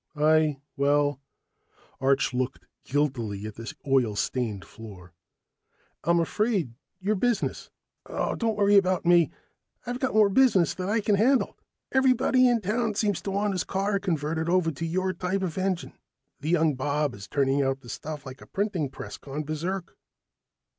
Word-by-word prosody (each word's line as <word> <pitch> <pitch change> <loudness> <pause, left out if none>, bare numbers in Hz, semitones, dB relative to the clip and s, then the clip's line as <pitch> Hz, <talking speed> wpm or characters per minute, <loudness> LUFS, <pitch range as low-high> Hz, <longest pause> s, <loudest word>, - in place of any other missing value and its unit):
"I 155 -1 +3 0.2
well 145 -1 +2 0.4
" - - -33
Arch 135 -1 +2
looked 130 +1 -2 0.2
guiltily 120 -8 -1
at 110 - -6
the 115 +2 -7
oil 130 -6 +2
stained 105 0 -2
floor. 95 -6 -12 0.9
"I'm 170 +1 +3
afraid 190 - 0 0.3
your 200 +3 0
business 235 +2 -1 0.2
" - - -57
"Oh, - - -1
don't 225 -2 -1
worry 205 0 +5
about 185 -2 +2
me. 175 -1 +5 0.6
I've 245 0 -3
got 260 -3 -1
more 215 -2 +6
business 200 - +4
than 185 +1 -4
I 220 +1 +2
can 210 - +1
handle. 255 +6 +3 0.4
Everybody 255 -1 +4
in 240 -2 +2
town 215 +2 -1
seems 205 -3 0
to - - -4
want 200 +1 0
his 185 - -1
car 200 +1 -1
converted 160 -3 -1
over 175 -2 +2
to 155 +3 -5
your 185 +3 0
type 190 +2 -2
of 175 -4 -3
engine. 185 -2 -2 0.5
That 150 - -4
young 165 -3 +3
Bob 145 +1 -1
is 100 0 -10
turning 140 0 +1
out 135 0 0
the 120 - -14
stuff 150 +1 -6
like 130 0 -9
a - - -13
printing 195 -8 -1
press - - -8
gone 145 +2 -5
berserk." 170 +4 -4
165 Hz, 165 wpm, -27 LUFS, 140-200 Hz, 0.9 s, more